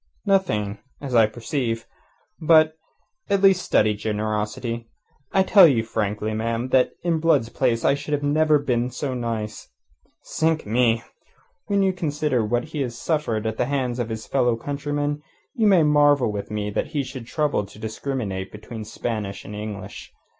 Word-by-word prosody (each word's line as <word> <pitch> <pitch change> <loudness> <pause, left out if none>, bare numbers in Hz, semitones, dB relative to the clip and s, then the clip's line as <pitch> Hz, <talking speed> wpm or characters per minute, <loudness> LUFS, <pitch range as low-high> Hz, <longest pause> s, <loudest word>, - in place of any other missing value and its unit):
"Nothing 110 - +1 0.2
as 135 -3 -6
I 115 -2 +6
perceive. 115 0 -3 0.5
But, 155 0 +5 0.6
at 200 0 +1
least, 190 -2 +6
study 105 0 +3
generosity. 110 +2 -3 0.4
I 190 - +4
tell 190 -2 +8
you 120 -7 +2
frankly, 105 -1 -2
ma'am, 115 +3 -2
that 130 -1 +3
in 170 -2 +1
Blood's 155 -8 +2
place 115 -2 0
I - - +5
should 145 +1 -2
never 155 +1 +3
have 145 - -7
been 125 -1 +1
so 130 +2 -3
nice. 115 -3 -4 0.5
Sink 160 0 0
me! 115 +1 +2 0.6
When 200 -1 +2
you 190 -1 +2
consider 150 -7 0
what 120 +3 0
he 155 -2 -3
has 120 -3 -3
suffered 120 -10 -1
at 110 0 -2
the - - +1
hands 130 -2 -1
of 120 -1 -2
his 110 -1 -5
fellow 125 -3 +2
countrymen, 145 +3 -3 0.3
you 225 -5 +2
may 185 -5 +6
marvel 145 -5 +4
with 100 -1 -5
me 105 -1 -3
that - - -1
he 140 - +1
should 130 -3 -8
trouble 145 -10 0
to 100 - -15
discriminate 110 -4 -4
between 110 +1 -8
Spanish 105 -3 -4
and 105 - -8
English. 105 -2 -7
120 Hz, 165 wpm, -23 LUFS, 110-150 Hz, 0.6 s, tell